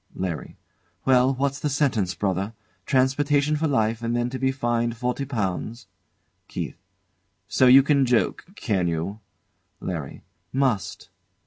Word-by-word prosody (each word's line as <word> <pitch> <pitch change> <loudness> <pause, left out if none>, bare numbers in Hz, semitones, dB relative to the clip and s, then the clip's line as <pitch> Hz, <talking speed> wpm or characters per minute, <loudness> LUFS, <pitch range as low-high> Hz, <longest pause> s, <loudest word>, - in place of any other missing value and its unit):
LARRY. 90 -4 -4 0.5
Well, 130 0 +4
what's 140 +1 -1
the 150 - -1
sentence, 120 - +1
brother? 95 +3 -1 0.3
Transportation 145 +2 +2
for 160 +2 0
life 115 -5 +1
and 115 0 -1
then 120 0 0
to 130 - -4
be 130 0 +2
fined 120 -3 -1
forty 125 +3 -2
pounds'? 110 -2 -3 0.6
KEITH. - - -6 0.7
So 125 +4 +4
you 135 +2 +8
can 140 -2 +3
joke, 120 -2 +1
can 95 - 0
you? 85 +6 -3 0.6
LARRY. 80 -7 -5 0.3
Must. 130 -8 -1
125 Hz, 130 wpm, -24 LUFS, 105-135 Hz, 0.7 s, you